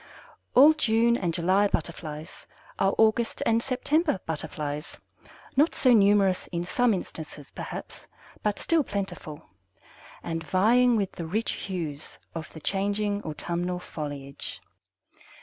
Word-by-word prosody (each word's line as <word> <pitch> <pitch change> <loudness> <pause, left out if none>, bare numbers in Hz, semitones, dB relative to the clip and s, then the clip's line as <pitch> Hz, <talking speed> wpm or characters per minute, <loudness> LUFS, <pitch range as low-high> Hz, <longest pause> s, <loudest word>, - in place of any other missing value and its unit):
All 290 +5 +9
June 235 -5 +3
and 180 -7 -1
July 185 +5 +3
Butterflies 155 -4 -4 0.3
are 195 - +2
August 225 +1 +2
and 230 0 +3
September 270 - +1
Butterflies, 150 -1 -4 0.6
not 295 +5 +3
so 255 -2 +4
numerous 200 -3 +4
in 170 -1 -3
some 240 +7 +2
instances, 155 -5 -7
perhaps, - - -7 0.3
but 210 -1 0
still 330 -2 +2
plentiful, 195 - -5 0.8
and 165 -1 -3
vying 230 +9 +4
with 200 -4 0
the 170 - -6
rich 215 +7 -1
hues 160 -6 -5 0.2
of 160 -2 -6
the 160 - -11
changing 205 +2 0
autumnal 175 +3 -3
foliage. 145 -5 -6
195 Hz, 120 wpm, -27 LUFS, 160-225 Hz, 0.8 s, All